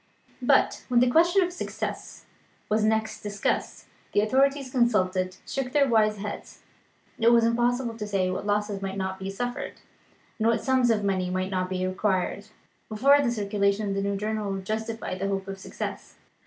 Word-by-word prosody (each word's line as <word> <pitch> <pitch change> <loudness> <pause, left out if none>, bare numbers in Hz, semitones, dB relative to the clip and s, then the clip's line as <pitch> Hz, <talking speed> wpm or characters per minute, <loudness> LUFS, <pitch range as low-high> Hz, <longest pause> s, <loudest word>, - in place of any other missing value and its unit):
But, - - +3
when 245 -2 +3
the 245 0 +4
question 345 +6 +5
of 355 0 -3
success - - -5 0.4
was 215 0 +2
next 220 0 0
discussed, 205 -1 -2 0.3
the 205 - +4
authorities 270 +4 +2
consulted 185 -7 +1
shook 260 -2 -3
their 285 -2 +4
wise 215 -3 +3
heads. 205 +1 -7 0.6
It 230 0 +5
was 235 -1 +5
impossible 240 +1 +1
to 210 - -4
say 190 -3 0
what 185 +2 -4
losses 205 -1 0
might 195 0 -4
not 190 0 -3
be 190 0 -4
suffered, 245 +5 -4 0.7
and 220 - +2
what 230 -1 +2
sums 260 -2 +3
of 215 -2 +2
money 190 -2 0
might 185 +1 -2
not 185 -1 -1
be 185 0 -1
required, 190 +1 -1 0.4
before 275 +7 +5
the 265 - +1
circulation 200 -1 0
of - - -1
the 195 - -1
new 200 0 -1
journal 210 0 -2
would 195 -1 -4
justify 220 -1 -3
the 195 +1 -2
hope 195 -1 -2
of 195 0 -6
success. - - -6
210 Hz, 180 wpm, -26 LUFS, 195-240 Hz, 0.7 s, question